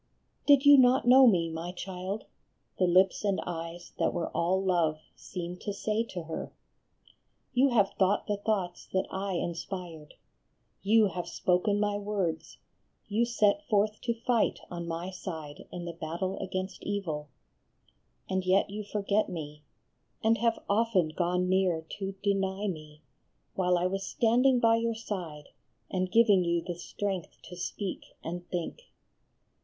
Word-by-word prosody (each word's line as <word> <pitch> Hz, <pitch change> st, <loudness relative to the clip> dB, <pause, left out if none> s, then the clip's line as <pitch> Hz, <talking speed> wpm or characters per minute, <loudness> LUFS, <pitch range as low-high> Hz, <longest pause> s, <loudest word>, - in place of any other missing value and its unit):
"Din 285 Hz, -2 st, +7 dB
you 285 Hz, 0 st, +8 dB
not 255 Hz, +1 st, +5 dB
know 260 Hz, +1 st, +8 dB
Me, 175 Hz, -7 st, +4 dB
my 165 Hz, +2 st, -5 dB
child? 185 Hz, +2 st, -5 dB, 0.3 s
" -, -, -46 dB
the 185 Hz, -, +4 dB
lips 185 Hz, +3 st, +4 dB
and 200 Hz, -2 st, +1 dB
eyes 170 Hz, 0 st, -6 dB
that -, -, +1 dB
were 170 Hz, -, -1 dB
all 180 Hz, +3 st, +1 dB
love 175 Hz, -5 st, +1 dB, 0.2 s
seemed 180 Hz, -1 st, -7 dB
to 205 Hz, -, -3 dB
say 215 Hz, +2 st, 0 dB
to 180 Hz, -6 st, -6 dB
her. 160 Hz, 0 st, -5 dB, 0.5 s
" -, -, -33 dB
You 265 Hz, +3 st, +4 dB
have 210 Hz, -6 st, +3 dB
thought 195 Hz, +1 st, +3 dB
the 205 Hz, -1 st, -1 dB
thoughts 200 Hz, -4 st, -2 dB
that 190 Hz, 0 st, +1 dB
I 195 Hz, 0 st, -2 dB
inspired, 170 Hz, -2 st, -5 dB, 0.7 s
you 215 Hz, +2 st, +5 dB
have 180 Hz, -2 st, -5 dB
spoken 195 Hz, +3 st, +1 dB
my 205 Hz, 0 st, 0 dB
words, 195 Hz, -6 st, -3 dB, 0.5 s
you 220 Hz, +3 st, +2 dB
set 230 Hz, +2 st, +2 dB
forth 210 Hz, 0 st, +2 dB
to 235 Hz, -2 st, -1 dB
fight 235 Hz, 0 st, +1 dB
on 170 Hz, -1 st, -5 dB
my 170 Hz, +3 st, -4 dB
side 160 Hz, -6 st, -7 dB
in 175 Hz, -1 st, -6 dB
the 170 Hz, -, -5 dB
battle 170 Hz, +4 st, -3 dB
against 190 Hz, 0 st, -4 dB
evil; 160 Hz, -8 st, -3 dB, 1.0 s
and 190 Hz, 0 st, -1 dB
yet 190 Hz, +2 st, +2 dB
you 210 Hz, +1 st, -4 dB
forget 205 Hz, +1 st, 0 dB
me, 150 Hz, -4 st, -6 dB, 0.6 s
and 225 Hz, +1 st, +3 dB
have 230 Hz, -1 st, +1 dB
often 200 Hz, -5 st, +2 dB
gone 180 Hz, +2 st, 0 dB
near 185 Hz, -3 st, +2 dB, 0.2 s
to 195 Hz, 0 st, -3 dB
deny 195 Hz, 0 st, 0 dB
me, 155 Hz, -4 st, -7 dB, 0.5 s
while 180 Hz, -1 st, +2 dB
I 175 Hz, -, 0 dB
was 195 Hz, +1 st, -1 dB
standing 245 Hz, +3 st, +3 dB
by 230 Hz, -1 st, +4 dB
your 230 Hz, 0 st, -1 dB
side 175 Hz, -9 st, -6 dB, 0.4 s
and 185 Hz, -1 st, -1 dB
giving 210 Hz, -4 st, +5 dB
you 170 Hz, -1 st, 0 dB
the 175 Hz, -, -4 dB
strength 185 Hz, +1 st, -4 dB
to 180 Hz, -, -10 dB
speak 185 Hz, +2 st, -5 dB
and 175 Hz, +2 st, -6 dB
think. 180 Hz, -, -4 dB
190 Hz, 155 wpm, -29 LUFS, 175-210 Hz, 1.0 s, you